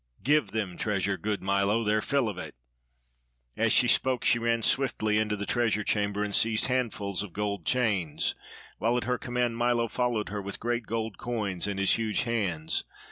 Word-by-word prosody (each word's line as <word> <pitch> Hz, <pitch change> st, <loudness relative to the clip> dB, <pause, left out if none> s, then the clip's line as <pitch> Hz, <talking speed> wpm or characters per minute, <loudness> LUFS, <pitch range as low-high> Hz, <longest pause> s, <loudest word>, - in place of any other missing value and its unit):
Give 150 Hz, +2 st, +3 dB
them 100 Hz, -5 st, -3 dB
treasure, 100 Hz, -2 st, 0 dB
good 105 Hz, +1 st, -3 dB
Milo 100 Hz, +3 st, +2 dB
their 105 Hz, 0 st, +2 dB
fill 140 Hz, -1 st, +1 dB
of 100 Hz, -4 st, -4 dB
it." -, -, -7 dB, 1.0 s
As -, -, +2 dB
she -, -, +4 dB
spoke 130 Hz, -2 st, +2 dB
she 120 Hz, -, +4 dB
ran 115 Hz, 0 st, 0 dB
swiftly 110 Hz, -6 st, +2 dB
into 105 Hz, -1 st, 0 dB
the 100 Hz, 0 st, -4 dB
treasure 110 Hz, -3 st, +1 dB
chamber 105 Hz, 0 st, 0 dB
and 105 Hz, -1 st, -3 dB
seized 110 Hz, +1 st, +3 dB
handfuls 115 Hz, -7 st, -1 dB
of 100 Hz, -5 st, -7 dB
gold 100 Hz, 0 st, -3 dB
chains, 105 Hz, -11 st, +1 dB, 0.5 s
while 115 Hz, +3 st, +2 dB
at 125 Hz, -, -1 dB
her 125 Hz, -1 st, -1 dB
command 120 Hz, -1 st, -1 dB
Milo 120 Hz, -1 st, +2 dB
followed 120 Hz, -3 st, -1 dB
her 105 Hz, 0 st, -4 dB
with 100 Hz, 0 st, -6 dB
great 120 Hz, -1 st, -2 dB
gold 110 Hz, -2 st, -3 dB
coins 105 Hz, -7 st, -2 dB
in 100 Hz, -1 st, -3 dB
his 100 Hz, +3 st, +3 dB
huge 110 Hz, -2 st, 0 dB
hands. 100 Hz, -10 st, -1 dB
110 Hz, 185 wpm, -28 LUFS, 100-120 Hz, 1.0 s, she